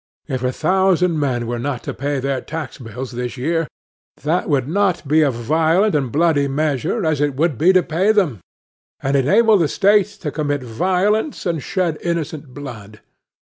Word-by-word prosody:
If 130 -4 -3
a 125 - +1
thousand 180 0 +2
men 125 -5 -1
were 120 +1 -3
not 135 0 -3
to - - -4
pay 140 +1 -2
their 135 -1 -2
tax 160 -6 -6
bills 125 +1 -7
this 125 +1 -5
year, 165 +5 0 0.6
that 165 +5 0
would 135 -3 +1
not 185 -2 0
be 155 +3 +4
a 150 - +4
violent 160 - +1
and 135 -5 0
bloody 150 -2 +2
measure, 140 0 -1
as 155 -2 +1
it 145 -2 0
would 155 +1 +1
be 175 +5 +5
to 185 -1 +4
pay 180 +6 +1
them, 180 - +1 0.6
and 135 +1 0
enable 205 - +4
the 165 - +2
State 200 +4 +3 0.2
to 150 - -1
commit 145 -3 -2
violence 190 - 0
and 165 -4 -1
shed 180 -2 -1
innocent 160 -4 -3
blood. 110 -7 -9
150 Hz, 175 wpm, -19 LUFS, 135-175 Hz, 0.6 s, be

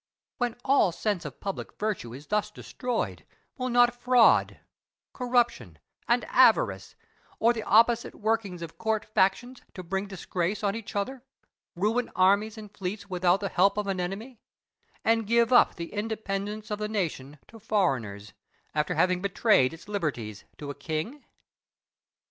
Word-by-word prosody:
When 245 -2 0
all 265 -9 +4
sense 185 -1 -2
of 150 - -8
public 195 -1 -5
virtue 205 - -2
is 135 +5 -10
thus 210 +4 0
destroyed, 245 +3 -4 0.3
will 255 -1 -3
not 245 -1 +5
fraud, 245 -1 +4 0.5
corruption, 240 - 0 0.3
and - - +2
avarice, 95 -1 +3 0.4
or 235 +2 +4
the 225 - -4
opposite 230 +3 +3
workings 210 -5 -1
of 165 - -10
court 220 -1 0
factions 215 +5 0
to 185 - -7
bring 195 +3 -3
disgrace 190 +1 -3
on 200 -1 +1
each 225 -2 -7
other, 245 +6 -2 0.5
ruin 220 +7 0
armies 200 +4 +3
and 210 -1 -11
fleets 200 +1 -5
without 180 +1 +2
the 200 - -2
help 195 +4 +3
of 210 - 0
an 195 -2 -2
enemy, 210 +7 -5 0.7
and 225 -1 +2
give 235 +2 +3
up 245 - +6
the 170 +2 -7
independence 210 0 -4
of 210 - -2
the 210 0 -2
nation 155 -9 -3
to 225 - -13
foreigners, 130 - -1 0.4
after 150 -1 0
having 180 0 +2
betrayed 200 - +3
its 165 +5 -12
liberties 140 - -3
to 145 -1 -6
a - - -6
king? 155 - -4
205 Hz, 150 wpm, -27 LUFS, 180-225 Hz, 0.7 s, up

